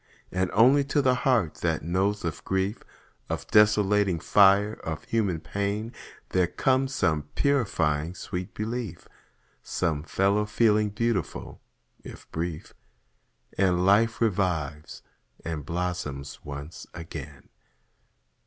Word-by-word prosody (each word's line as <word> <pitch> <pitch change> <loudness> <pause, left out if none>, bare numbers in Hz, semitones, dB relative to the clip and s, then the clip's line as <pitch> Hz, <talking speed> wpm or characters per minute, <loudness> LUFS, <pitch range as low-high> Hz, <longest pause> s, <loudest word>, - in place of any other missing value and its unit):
And 95 0 0
only 130 +6 +6
to 140 +2 +1
the 130 -2 +4
heart 125 - +1
that - - 0
knows 95 +4 0
of 80 -1 -4
grief, 95 +2 -1 0.5
Of - - -3
desolating 105 -3 +4
fire, 100 +4 +5
of 80 -1 -4
human 100 -8 0
pain, 100 +6 -3 0.4
There 90 -1 +2
comes 130 +7 +1
some 75 -4 0
purifying 90 - +1
sweet 90 0 -6
belief, 110 -5 -4 0.5
Some 80 -5 -1
fellow 100 +6 +1
feeling 105 -1 +3
beautiful, 105 -2 -2 0.4
if - - -11
brief. 80 -1 -4 0.9
And 90 -2 +3
life 110 +4 +4
revives, 85 -9 -1 0.4
and 75 -3 -4
blossoms 85 -6 -4
once 70 +2 -8
again. 85 -1 -9
95 Hz, 110 wpm, -27 LUFS, 85-105 Hz, 0.9 s, only